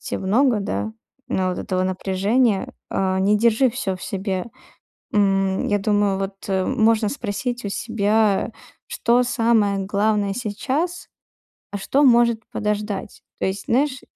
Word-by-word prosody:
тя - - -3
много, 225 +3 +2
да, 105 - -3 0.4
а, 185 -1 0
вот 180 - -4
этого 185 -1 -1
напряжения, 195 +4 0 0.2
э, 190 -1 0
не 200 +2 +3
держи 235 +4 +3
всё 200 -5 -3
в 185 - -14
себе. 190 -1 -3 0.6
М, 195 -2 +1
я 205 - +2
думаю 205 -1 +1
вот, 195 0 -3
э, 190 -1 0
можно 220 -1 +2
спросить 240 0 -4
у 200 - -3
себя, 215 -1 +1 0.3
что 240 +1 +2
самое 225 -5 +2
главное 200 +1 0
сейчас, 260 - -3 0.6
а 200 - -3
что 270 +8 +1
может 235 -3 +4
подождать. 210 -1 -3 0.2
То - - 0
есть, 190 +1 -3
знаешь, 265 +2 +1
205 Hz, 140 wpm, -22 LUFS, 195-235 Hz, 0.6 s, может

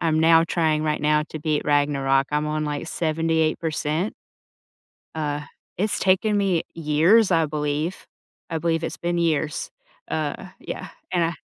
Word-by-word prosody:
I'm 160 -2 +1
now 165 +1 +6
trying 160 -2 +1
right 150 -1 0
now 150 0 +2
to 155 - -6
beat 150 0 0
Ragnarok. 140 -2 +2
I'm 150 +1 0
on 155 0 -1
like 150 +1 -3
78%. 160 +1 0 1.0
Uh, 150 -2 -2 0.4
it's 210 +4 0
taken 200 +3 +2
me 190 -5 +1
years, 165 +7 +4
I 165 -2 +4
believe. 150 +3 -3 0.4
I 165 - -1
believe 165 0 0
it's - - -4
been 175 0 -1
years. 155 -3 0 0.4
Uh, 155 +4 -3
yeah, - - -6 0.2
and 175 -2 +2
I 165 - -1
160 Hz, 145 wpm, -23 LUFS, 150-170 Hz, 1.0 s, now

